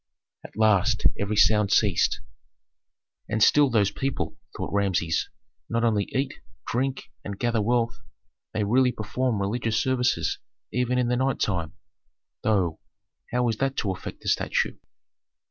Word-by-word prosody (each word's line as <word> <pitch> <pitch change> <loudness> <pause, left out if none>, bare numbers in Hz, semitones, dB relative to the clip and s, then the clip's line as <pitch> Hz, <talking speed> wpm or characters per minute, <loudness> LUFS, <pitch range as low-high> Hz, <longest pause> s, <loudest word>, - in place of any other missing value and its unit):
At - - -12
last 110 0 +3
every 100 +1 -1
sound 105 -1 +4
ceased. 105 -5 +2 1.1
"And 110 -1 +2
still 145 +2 +5
those 105 -4 +2
people," 135 +5 -3 0.2
thought - - -4
Rameses, 95 -5 0 0.4
"not 115 0 0
only 105 -4 +2
eat, 135 +1 -3 0.3
drink, 130 +3 -2
and 100 -1 -6
gather 120 -1 0
wealth 115 0 0 0.5
they 105 - -1
really 125 +5 +3
perform 110 +1 -2
religious 110 +2 -1
services 125 -10 0 0.3
even 125 +1 +1
in 125 -1 +2
the 125 - +1
night 130 0 0
time; 85 -6 -1 0.7
though, 95 -7 +1 0.5
how 125 0 +1
is 115 -2 0
that 135 +1 -1
to 100 - 0
affect 95 - -7
the - - -9
statue?" - - 0
110 Hz, 140 wpm, -26 LUFS, 100-125 Hz, 1.1 s, still